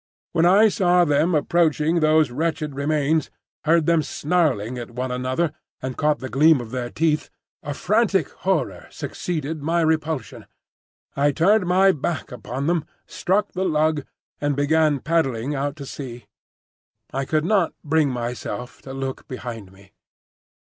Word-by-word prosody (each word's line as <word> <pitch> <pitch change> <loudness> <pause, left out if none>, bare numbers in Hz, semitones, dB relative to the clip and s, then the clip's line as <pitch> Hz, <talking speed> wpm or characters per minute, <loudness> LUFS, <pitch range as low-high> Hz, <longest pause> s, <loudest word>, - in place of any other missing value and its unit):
When 170 0 +3
I 200 +5 +6
saw 180 -4 +3
them 155 +3 +2
approaching 160 +1 +2
those 155 -3 +3
wretched 155 +1 -2
remains, 150 +2 0 0.4
heard 165 0 +4
them 165 -1 +3
snarling 145 - 0
at 120 - -7
one 125 +2 -4
another 130 +6 -1 0.3
and 130 -1 -5
caught 150 -1 +1
the 130 - -6
gleam 150 +3 +4
of 115 -2 -7
their 125 -1 -3
teeth, 155 +1 0 0.3
a 145 - -5
frantic 200 - +1
horror 160 - -2
succeeded 160 -3 -4
my 165 +3 +1
repulsion. 160 -5 -1 0.7
I 145 +1 +3
turned 185 +6 +3
my 190 +2 +5
back 155 -1 -3
upon 125 +2 -5
them, 170 -1 +1 0.2
struck 205 +3 0
the 185 - -2
lug 155 -4 +1 0.4
and 145 -1 0
began 145 0 +2
paddling 145 -5 0
out 140 0 -2
to 140 -3 -8
sea. 125 -4 -8 0.9
I 135 - -1
could 155 +3 0
not 190 -3 +2
bring 155 -1 +2
myself 125 0 -5
to 135 - -9
look 135 -1 -5
behind 115 -6 -7
me. 95 0 -19
150 Hz, 150 wpm, -23 LUFS, 130-165 Hz, 0.9 s, I